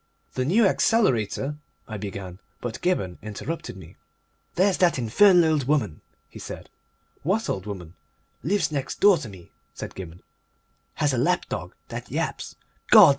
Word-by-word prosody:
"The 130 - -1
New 205 - +4
Accelerator 145 - +2 0.2
" - - -42
I - - -2
began, 95 -2 -6 0.2
but 120 -2 -5
Gibberne 100 - 0
interrupted 110 - -5
me. 95 - -13 0.6
"There's 190 +2 +3
that 175 -5 +4
infernal 165 - +5
old 150 -4 +1
woman!" 130 - +1 0.3
he - - -12
said. - - -8 0.5
"What 195 +8 0
old 95 +1 -3
woman?" 90 -5 -7 0.5
"Lives 190 0 +1
next 140 -3 -3
door 200 -4 +6
to 115 - -7
me," 90 -4 -13 0.2
said - - -6
Gibberne. 90 -2 -9 0.7
"Has 145 -2 +1
a 125 - +1
lapdog 120 - -1
that - - -6
yaps. - - -3 0.3
Gods! - - +10
130 Hz, 150 wpm, -25 LUFS, -, 0.7 s, Gods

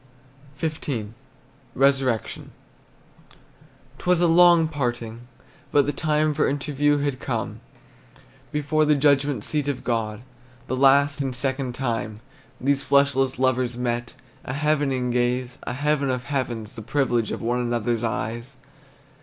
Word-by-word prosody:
XV. 145 -8 -3 0.7
RESURRECTION. 135 -4 +1 1.5
'T - - -12
was 180 -1 +4
a 175 - +4
long 170 -1 +6
parting, 120 -5 -4 0.4
but 145 -1 +4
the 145 - -1
time 155 +1 +1
For 150 - +1
interview 145 +1 +1
had 140 -2 -2
come; - - -3 0.9
Before 150 +1 +1
the 150 0 +4
judgment 140 -1 +2
seat 150 -2 -1
of 140 -3 -2
God, 110 -2 -2 0.4
The 130 - -2
last 140 +2 +4
and 135 -2 -2
second 130 -1 -2
time 115 -4 -3 0.4
These 140 +1 +1
fleshless 140 -2 +2
lovers 130 -1 +1
met, 120 -1 -2 0.3
A 135 - -5
heaven 150 0 +1
in 125 -1 -1
a - - 0
gaze, 125 +1 -1
A - - -2
heaven 145 +1 0
of 125 -1 -1
heavens, 120 -5 -3
the 115 - -8
privilege 120 -2 0
Of - - -3
one 120 +2 0
another's 120 -1 -1
eyes. 115 +3 -3
135 Hz, 135 wpm, -24 LUFS, 120-145 Hz, 1.5 s, long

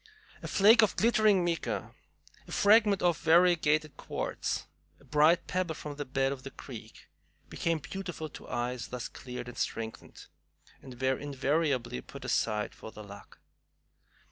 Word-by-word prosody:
A - - -6
flake 215 +4 +6
of 215 - +2
glittering 215 -5 +4
mica, 170 -1 -2 0.5
a - - -11
fragment 205 -2 +4
of 175 -3 +2
variegated 160 -3 +3
quartz, - - -3 0.3
a - - -21
bright 155 +3 +4
pebble 180 -3 -2
from 150 -1 -7
the 145 - -4
bed 135 0 0
of 135 -2 -5
the 135 - -7
creek, 115 -5 -11 0.4
became 165 -1 0
beautiful 175 0 -6
to - - -12
eyes 120 0 -2
thus 125 -1 -5
cleared 125 -1 -8
and 120 - -8
strengthened, 110 -1 -5 0.6
and 125 -2 -11
were 130 0 +1
invariably 140 - -1
pat - - -11
aside 105 -1 0
for 110 - -10
The 105 - -10
Luck. 100 0 -13
150 Hz, 145 wpm, -30 LUFS, 125-175 Hz, 0.6 s, flake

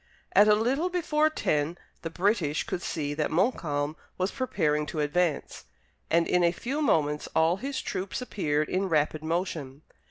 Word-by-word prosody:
At 205 - +7
a 210 - +6
little 265 +11 +1
before 310 -4 +2
ten 155 - -1 0.2
the 165 - -4
British 175 -4 +1
could 175 - -4
see 145 -5 -2
that 150 0 -1
Montcalm 155 - 0 0.2
was 185 +2 0
preparing 150 - 0
to 155 - -4
advance, 150 +1 -1 0.4
and 170 0 +3
in 180 0 +3
a 170 - +4
few 265 - -3
moments 150 - +1
all 165 +3 +3
his 270 +5 -3
troops 190 +4 -3
appeared 155 -11 -1
in 190 +1 -1
rapid 155 -1 +1
motion. 160 -4 -3
170 Hz, 160 wpm, -28 LUFS, 150-210 Hz, 0.4 s, At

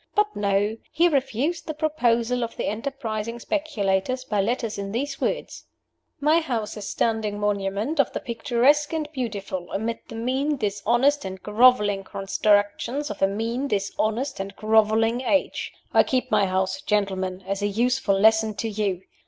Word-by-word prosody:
But 420 0 +2
no! 205 +2 +1
He 345 +2 +4
refused 285 +2 -1
the 310 - -4
proposal 250 -6 +1
of 230 - -5
the - - -2
enterprising 225 -1 -3
speculators 255 -5 -1
by 210 -5 0
letter 230 +3 0
in 195 0 -5
these 275 +4 -3
words: - - -3 0.5
'My 305 +3 +4
house 240 -10 -2
is - - -8
a - - -6
standing 215 0 -1
monument 205 +7 -1
of 280 - +3
the - - -3
picturesque 265 +5 +1
and 315 -2 -1
beautiful, 200 - -4
amid 225 +3 -2
the 230 - -9
mean, 265 +6 0
dishonest, 240 +6 +1
and 190 -1 -6
groveling 210 -3 +4
constructions 205 +8 0
of 205 - -8
a 195 - +5
mean, 230 +7 -2
dishonest, 215 +4 -1
and 195 +1 -5
groveling 220 +2 +3
age. 285 +3 0 0.2
I - - +7
keep 255 -1 -1
my 205 -2 +3
house, 190 +9 -1
gentlemen, 190 -4 -1
as 195 +1 -3
a 205 - +1
useful 230 -1 +1
lesson 220 0 +4
to 225 +4 -2
you. 200 -3 -2
225 Hz, 160 wpm, -24 LUFS, 205-260 Hz, 0.5 s, I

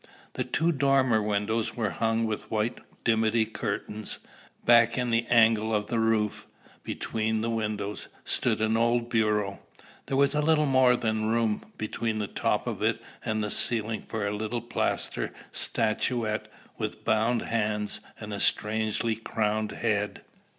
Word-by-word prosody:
The - - -1
two 165 +3 +1
dormer 135 -6 +3
windows 105 +2 -1
were 110 -4 -1
hung 115 0 +1
with 110 -1 -4
white 110 +2 -1 0.2
dimity 110 0 +3
curtains. 110 -1 -3 0.5
Back 115 0 +6
in 125 -1 0
the 115 0 +1
angle 110 -2 +4
of 105 0 0
the 115 - +1
roof, 110 -2 +1 0.4
between 110 0 -2
the 115 +1 -1
windows, 105 -2 -3 0.2
stood - - +1
an 110 0 +2
old 120 +1 +1
bureau. 105 -3 +1 0.5
There 135 - 0
was 140 +1 +4
little 150 +1 +3
more 130 -2 +5
than 110 -2 0
room 115 -1 0
between 110 0 -2
the 105 - -1
top - - -1
of - - -4
it - - +1 0.2
and 110 -1 -1
the 105 - -2
ceiling 110 -2 0
for 110 -2 -4
a 100 +1 -1
little 110 +3 -2
plaster 120 - -1 0.2
statuette 110 0 0 0.3
with - - -4
bound 110 +2 +2
hands 105 -2 -1 0.2
and 105 -1 -6
a 100 - -3
strangely 110 +1 +1
crowned 110 -1 -1
head. 105 -3 -1
110 Hz, 150 wpm, -28 LUFS, 105-115 Hz, 0.5 s, Back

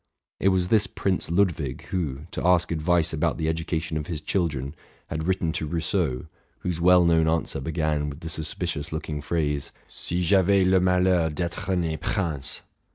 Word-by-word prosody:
It - - +1
was 95 -2 +2
this 105 -3 +4
Prince 95 -1 -1
Ludwig 85 -7 0
who, 75 -7 -2
to - - -4
ask 90 -1 +3
advice 85 0 +1
about 75 - 0
the 80 - -1
education 80 0 -2
of 75 - -4
his 85 -4 -3
children, 75 -5 -1 0.4
had 80 0 -3
written 90 -2 0
to 80 - -2
Rousseau, 80 -4 -1 0.4
whose 85 -2 -2
well 90 0 +6
known 80 -1 +4
answer 80 -3 0
began 75 0 -1
with 70 +2 -9
the 80 - -5
sus 80 -1 -1
picious 80 -5 -3
looking 75 -1 -4
phrase, 75 -2 -1
'' - - -33
Si 90 +1 -2
j'avais 95 +1 +4
le 95 0 +4
malheur 90 -2 +3
@étre 85 +4 -2
né 80 -3 -1
prince." 80 -10 -2
85 Hz, 175 wpm, -25 LUFS, 80-90 Hz, 0.4 s, well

